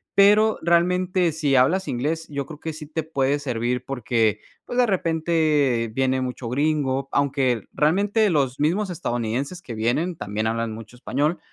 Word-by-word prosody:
pero 210 +2 +5
realmente, 180 +1 +2
si 145 -3 0
hablas 175 +10 +3
inglés, 155 +7 -2
yo 140 -2 -3
creo 150 +2 -10
que 160 -1 -5
sí 155 0 -8
te 160 +1 -3
puede 140 -2 0
servir 125 -2 -2
porque, 115 -5 0 0.2
pues, 245 - -5
de 250 - +5
repente 160 - +1
viene 130 0 +1
mucho 125 -2 -4
gringo. 135 -1 0
Aunque 135 -5 0
realmente 200 +8 +2
los 140 -6 0
mismos 180 +7 +1
estadounidenses 135 +1 -3
que 120 - -8
vienen 125 +11 0
también 110 -5 -3
hablan 115 0 -1
mucho 110 +1 -10
español 145 +6 -1
145 Hz, 155 wpm, -23 LUFS, 125-170 Hz, 0.2 s, pero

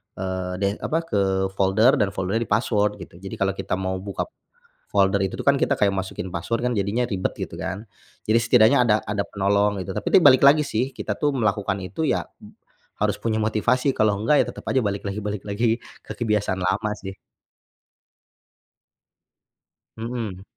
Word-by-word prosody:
eee, 95 -1 -3
de 100 - +2
apa, 165 +2 -1
ke 95 -8 0
folder 100 +6 +3
dan 100 - +3
foldernya 100 +5 -1
di-password 105 -3 +1
gitu. 85 - -15
Jadi, 95 +1 -7
kalau 95 0 0
kita 95 - -3
mau 95 0 -3
buka 100 0 -4
p - - -13 0.6
folder 100 0 +3
itu 95 - -3
tuh - - -6
kan, 140 - +5
kita - - 0
kayak 100 -1 +2
masukin 95 -1 -4
password 95 +7 -3
kan, - - -1
jadinya 105 +5 0
ribet 95 -5 -2
gitu - - -5
kan. 100 +4 -5 0.4
Jadi, 110 - +4
setidaknya 120 +3 +5
ada 110 -3 +4
ada 105 0 -3
penolong 100 0 +1
gitu, 95 0 -6
tapi - - -2
ini - - +7
balik 130 0 +5
lagi 145 +2 +7
sih, 135 -2 -1
kita - - -4
tuh 145 -1 +1
melakukan 100 -5 0
itu 125 - -4
ya, - - 0 0.7
harus - - +1
punya 110 -1 0
motivasi. 125 +5 +1
Kalau 110 -2 +2
enggak 130 +7 +3
ya - - -11
tetap - - -11
aja 130 - +2
balik 100 0 -2
lagi 100 +2 -4
balik 105 -1 -3
lagi 115 +3 0 0.2
ke - - -7
kebiasaan 105 -4 0
lama 105 +4 0
sih. 95 0 -7 2.8
Mhm. 110 -5 -5
105 Hz, 180 wpm, -23 LUFS, 95-115 Hz, 2.8 s, ini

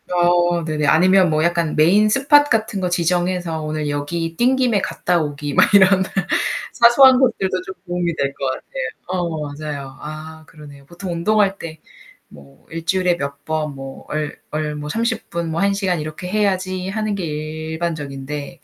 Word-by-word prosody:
어, 175 -1 +2
네네. 155 -2 -1
아니면 185 +4 +5
뭐 155 0 +1
약간 170 -2 0
메인 195 +8 +4
스팟 290 +5 +5
같은 220 -6 -1
거 180 - 0
지정해서 175 -1 0
오늘 155 0 -3
여기 165 +3 -3
뛴 250 +7 +3
김에 245 -6 +2
갔다 180 -2 0
오기 145 -1 -4
막 - - +4
이런 190 -1 +6 0.7
사소한 255 +2 +6
것들도 195 -8 +1
좀 190 - -7
도움이 175 -1 -1
될 140 -2 -1
것 135 - -5
같아요. - - -5 0.2
어, 170 -4 -2
맞아요. 145 -3 -7
아, 155 +1 -8
그러네요. 145 -3 -14
보통 175 +4 -7
운동할 195 +3 +2
때 160 -3 -8 0.5
뭐 70 -1 -17
'1 165 0 -6
주일에 180 -1 +1
몇 140 -2 -5
번 155 -2 -3
뭐 135 0 -9
얼 150 -1 -3
얼 150 0 -2
뭐 150 0 -6
30 225 +5 -2
분 170 -1 -3
뭐 160 - -2
1 200 0 +2
시간 190 -4 -1
이렇게 155 +4 -6
해야지.' 185 -3 0
하는 215 +1 -2
게 195 -3 -3
일반적인데 155 -2 -5
170 Hz, 295 characters per minute, -20 LUFS, 155-190 Hz, 0.7 s, 이런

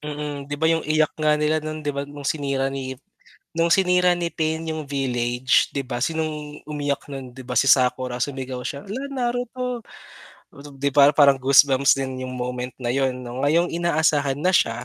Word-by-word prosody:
Mm, 150 0 -5
di 145 - -3
ba 160 - -2
yung 165 0 +2
iyak 155 0 +2
nga 150 0 +3
nila 150 +1 +1
nun 155 0 -6
di 145 - 0
ba 140 0 -4
nung 145 -1 -10
sinira 135 -2 -1
ni 130 -1 -4 0.6
nung 165 +1 +1
sinira 180 -1 +4
ni 170 -1 -2
Pain 160 0 -1
yung 155 -2 -4
village, 125 -2 +1
di 140 - -1
ba, 120 -2 -5
sinong 150 0 -3
umiyak 145 -2 -2
nun, 135 -2 -7
di 130 - -9
ba 125 - -5
si 135 - +3
Sakura 125 -1 +2
sumigaw 130 -2 -4
siya, 140 0 -5
"Hala, 250 +7 -4
Naruto!" 245 -1 -3 1.0
'Di 140 +1 0
ba 145 0 +7
parang 140 -2 +5
goosebumps 135 0 +5
din 130 -1 -4
yung 130 0 -5
moment 125 0 -4
na 120 -2 -4
yun 130 -1 0
'no. 125 +2 -5
Ngayong 170 +4 +3
inaasahan 155 -5 +1
na 185 +3 +2
siya, 120 -5 +1
145 Hz, 185 wpm, -23 LUFS, 130-155 Hz, 1.0 s, ba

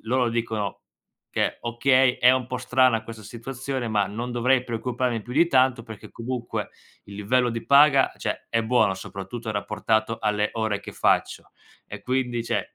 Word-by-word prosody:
loro 125 +2 +1
dicono 110 -4 -2 0.6
che, - - 0
okay, 130 +2 +3
è 125 - +6
un 130 -2 +1
po' 125 0 -4
strana 125 -2 +2
questa 110 0 -10
situazione, 125 +3 -5
ma 105 -3 +1
non 115 +5 -5
dovrei 125 +1 +2
preoccuparmi 120 0 -2
più 120 - -9
di 165 +5 +4
tanto, 130 -4 +3
perché 110 -3 -11
comunque 120 0 -4 0.4
il 100 - -10
livello 120 +4 +1
di 115 0 -5
paga, 140 -1 +5
cioè - - -4
è 115 0 0
buono, 110 -4 +2
soprattutto 100 +4 -7
rapportato 110 +2 -1
alle 105 -1 0
ore 110 -2 -1
che - - -9
faccio. - - 0 0.4
E - - -8
quindi, 125 -2 -1
cioè, 120 0 0
120 Hz, 165 wpm, -24 LUFS, 110-125 Hz, 0.6 s, è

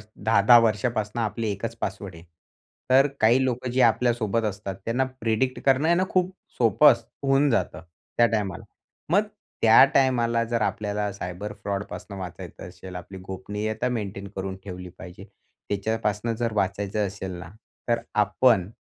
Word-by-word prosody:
10-10 115 +3 +5
वर्षापासून 110 0 0
आपली 110 0 -2
एकच 115 +3 -5
पासवर्ड 95 -2 -4
आहे, 80 - -13 0.7
तर 135 +2 +6
काही 120 +4 +4
लोकं, 125 0 -2
जे 130 +1 +2
आपल्यासोबत 115 -1 +2
असतात, 100 -2 -4
त्यांना 125 +3 +1
प्रेडिक्ट 115 +3 0
करणं 135 +2 +3
आहे 170 - +4
ना, 185 - +2
खूप 185 0 +1 0.3
सोपं 120 +5 +6
असत - - -3 0.2
होऊन 135 +1 +3
जातं 115 -9 -1 0.4
त्या 120 - +6
टायमाला. 105 -5 -2 0.5
मग 200 +5 +4 0.4
त्या 110 0 +8
टायमाला, 120 -3 +2
जर 115 - -8
त्या 120 - +1
टायमाला - - +1
आपल्याला 105 0 -3
सायबर 100 +2 -6
फ्रॉडपासून 100 0 -5
वाचायचं 90 -2 -8
असेल, 90 +1 -11
आपली 95 +2 -8
गोपनीयता 105 +5 -3
मेंटेन 100 -4 -4
करून 95 0 -4
ठेवली 90 -2 -8
पाहिजे. 95 +2 -11 0.4
त्याच्यापासनं 105 +2 -1
जर 115 -1 -2
वाचायचं 100 +1 -1
असेल 95 -1 -6
ना, 85 0 -9 0.4
तर 115 0 +1
आपण 105 -1 +3
110 Hz, 155 wpm, -25 LUFS, 100-120 Hz, 0.7 s, त्या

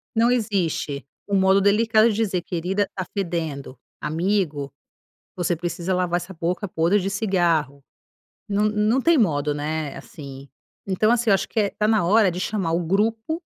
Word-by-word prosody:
Não 230 +2 +4
existe 185 - -1 0.2
o 200 - 0
modo 190 +1 +4
delicado 220 +3 +4
de 215 - -1
dizer: 200 -5 0
“Querida, 185 +4 -2
tá 185 - -3
fedendo!”. 160 -9 -3 0.2
“Amigo, 155 -3 -1 0.7
você 175 -1 0
precisa 175 +2 -3
lavar 180 -1 +1
essa 180 +2 -9
boca 180 +4 -2
podre 170 +4 +2
de 195 +1 -2
cigarro”. 170 - 0 0.7
Não 205 +1 +1
não 215 +4 +2
tem 330 +3 +4
modo, 150 - +1
né, 150 0 -3
assim. 140 - -10 0.4
Então, 195 +3 +2
assim, 240 -1 +2
eu - - +6
acho 195 - -1
que - - -4
está 210 +1 0
na 220 -5 +3
hora 200 +2 +4
de 175 - -5
chamar 185 -3 -1
o 170 - +1
grupo 220 - 0
190 Hz, 165 wpm, -23 LUFS, 165-210 Hz, 0.7 s, eu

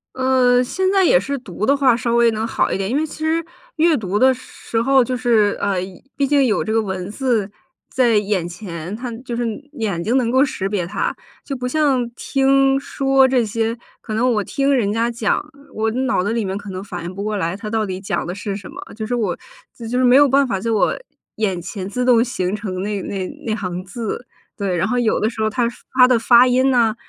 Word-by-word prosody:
嗯， 255 -1 +3
现 375 +9 0
在 390 -1 +4
也 250 - +5
是 275 +9 -3
读 205 -3 -4
的 280 - +4
话 265 -4 +3
稍 235 0 -1
微 235 0 +5
能 220 0 -2
好 225 - 0
一 - - 0
点， 195 0 -2
因 250 - -1
为 305 - +1
其 310 +1 -6
实 330 +1 +1 0.3
阅 325 -1 +4
读 205 -1 -2
的 260 +2 +6
时 250 -2 -5
候 265 +2 +4
就 250 +1 -2
是 230 -5 +2
呃， 200 -2 0 0.4
毕 280 -1 +1
竟 280 -1 +3
有 220 -4 +1
这 220 - -3
个 225 - +3
文 190 -1 -4
字 220 -3 -1 0.4
在 250 -3 +2
眼 200 -4 0
前， 175 0 -7
它 245 +2 -5
就 240 - -4
是 240 - -1 0.3
眼 205 - -2
睛 235 +5 0
能 245 -3 +2
够 260 +3 +4
识 195 -8 -3
别 195 -4 -1
它。 175 - -2 0.3
就 275 - -5
不 250 0 -3
像 270 -3 +1
听、 270 0 +2
说 270 -1 +2
这 255 -2 +2
些， 225 +1 -1 0.3
可 220 - -6
能 245 +3 +2
我 210 -2 0
听 275 +4 0
人 215 -6 +1
家 230 +1 +1
讲， 230 -2 0 0.3
我 220 +1 0
脑 255 -4 0
子 205 - -1
里 230 -2 -1
面 190 0 -3
可 205 0 -7
能 185 0 -6
反 175 -4 -7
应 175 +2 -6
不 200 - -4
过 215 0 -2
来 175 0 -2
他 215 0 -7
到 220 0 0
底 185 -2 -4
讲 195 - -2
的 175 - -4
是 200 -1 -4
什 195 -2 -8
么， - - -10 0.2
就 220 0 -5
是 245 - -1
我 205 -7 -1 0.4
就 230 -2 -8
是 255 - +2
没 250 +1 +6
有 285 0 +6
办 275 +1 +3
法 195 -5 -1
就 230 +2 -1
我 210 - +2 0.4
眼 195 -5 0
前 190 +2 -6
自 250 +4 -2
动 235 -2 +5
形 210 -6 -2
成 190 -3 -4
那 205 -1 -2
那 190 -1 -4 0.2
那 215 - 0
行 185 -3 -4
字。 230 +4 -5 0.3
对， 195 -4 -2
然 170 - +1
后 245 +2 0
有 230 -2 +1
的 215 - +1
时 225 -2 -6
候 220 - +2
他 235 +2 0 0.3
发 250 -1 +8
的 250 -2 +3
发 240 +2 +6
音 255 +1 +3
呐， 235 -4 +3
230 Hz, 255 characters per minute, -20 LUFS, 200-255 Hz, 0.4 s, 发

